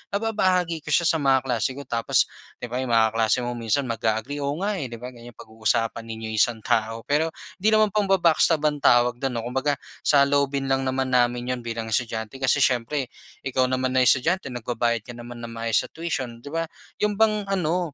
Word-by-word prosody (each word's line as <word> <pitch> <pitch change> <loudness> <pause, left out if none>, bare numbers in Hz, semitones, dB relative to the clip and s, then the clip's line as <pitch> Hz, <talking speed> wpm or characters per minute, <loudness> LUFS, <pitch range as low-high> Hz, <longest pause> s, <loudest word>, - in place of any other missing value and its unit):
nababahagi 185 -6 +1
ko 155 - -24
siya 175 - +3
sa 165 - +3
mga 135 -3 +3
kaklase 120 -1 0
ko 140 - -7
tapos 115 -1 +2 0.4
'di - - -2
ba 125 - -2
'yong 125 - -3
mga 115 -1 +5
kaklase 115 +1 +2
mo 120 - -2
minsan 115 +4 0
mag-a-agree, 115 +5 -2
"Oo 140 +3 -2
nga 205 +2 -1
eh." 135 -10 -5
'Di 115 - -7
ba 125 - -7
ganyan 120 +1 -12
pag-uusapan 115 0 -2
ninyo 110 -1 -6
'yong 110 - -4
isang 115 +1 +2
tao 110 +1 0
pero 155 +3 +1 0.3
'di 210 +3 +2
naman 215 0 +5
pamba-backstab 185 -6 +3
ang 150 -1 -1
tawag 120 0 +5
do'n 135 +1 -2
'no. 120 -2 -3
Kumbaga 135 +3 -1 0.2
saloobin 140 -1 +2
lang 135 0 +1
naman 130 0 -1
namin 125 0 +1
'yon 125 - -8
bilang 115 -1 -4
estudyante 110 0 -2
kasi 135 +1 +2
siyempre 130 +3 -1 0.4
ikaw 130 -1 +1
naman 130 0 0
na 130 - +4
estudyante 135 +8 +2
nagbabayad 120 -2 -2
ka 120 - -8
naman 120 0 -9
ng 115 - -6
maayos 115 -1 0
sa - - -9
tuition, 135 -8 -4
'di 145 - -8
ba? 165 +1 -1 0.3
'Yon 210 0 +1
bang 215 -1 +2
ano 175 -4 -1
130 Hz, 205 wpm, -24 LUFS, 115-155 Hz, 0.4 s, mga